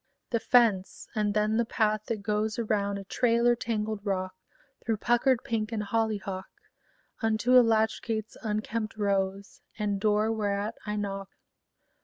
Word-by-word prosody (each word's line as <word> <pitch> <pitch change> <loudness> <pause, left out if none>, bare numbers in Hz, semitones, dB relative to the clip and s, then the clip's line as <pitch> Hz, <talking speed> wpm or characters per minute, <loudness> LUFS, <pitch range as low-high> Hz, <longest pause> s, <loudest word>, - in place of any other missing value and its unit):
The 230 - +2
fence; 225 -6 +2
and 210 -1 0
then 215 +1 +2
the 235 - +3
path 215 -2 0
that 220 -3 -3
goes 215 +1 0
Around 205 -3 0
a 200 - -6
trailer 235 +3 +2
tangled 215 -3 -3
rock, 185 -2 -2 0.5
Through 225 -2 0
puckered 240 +3 +2
pink 220 -1 -2
and 215 -2 -2
hollyhock, 205 -3 -2 0.7
Unto 225 +2 +2
a 250 - +10
latch 220 -1 +2
gate's 220 -2 -3
unkempt 215 0 -3
rose, 200 -1 -1 0.2
And 205 -2 -1
door 215 +1 +2
whereat 205 0 -1
I 210 - -1
knock. 195 -2 -4
215 Hz, 145 wpm, -28 LUFS, 200-225 Hz, 0.7 s, a